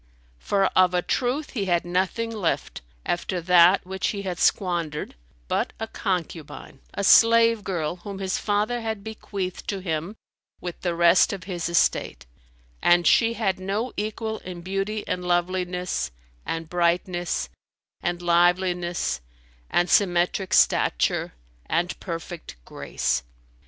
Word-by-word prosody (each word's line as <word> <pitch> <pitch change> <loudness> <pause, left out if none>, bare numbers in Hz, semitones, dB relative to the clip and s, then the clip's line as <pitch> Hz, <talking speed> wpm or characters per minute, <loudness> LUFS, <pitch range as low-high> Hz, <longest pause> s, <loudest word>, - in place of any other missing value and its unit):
For 195 - +1
of 180 -1 +5
a 180 - +1
truth 265 +4 -1
he 210 -7 -2
had 175 -2 +1
nothing 190 +6 -1
left, 200 - -2 0.2
after 175 +1 -1
that 180 +2 +5
which 190 +1 -2
he 200 -2 -3
had 180 -3 -4
squandered, 170 -5 0 0.3
but - - -1
a 225 - -2
concubine, 175 -10 -4 0.2
a 200 - -2
slave 230 +1 +6
girl 175 -3 -2
whom 200 +1 -8
his 190 -1 -2
father 210 +4 0
had 220 -3 -4
bequeathed 200 -4 -5
to 200 - -2
him 170 +2 -3 0.4
with 175 -1 -7
the 175 -2 -1
rest 170 +3 +5
of 195 -3 -6
his 175 -2 -3
estate: 170 - +1 0.6
and 175 0 +4
she 230 0 +4
had 195 -5 0
no 205 +6 -2
equal 220 +1 -3
in 180 -1 -8
beauty 195 +4 -3
and 180 - -2
loveliness 180 0 -1 0.4
and 165 0 -3
brightness 175 - 0 0.5
and 175 0 -2
liveliness 175 - +1 0.5
and 175 - +2
symmetric 180 0 +2
stature - - +2 0.3
and 175 +2 0
perfect 170 - -7
grace. - - -2
180 Hz, 130 wpm, -25 LUFS, 175-200 Hz, 0.6 s, slave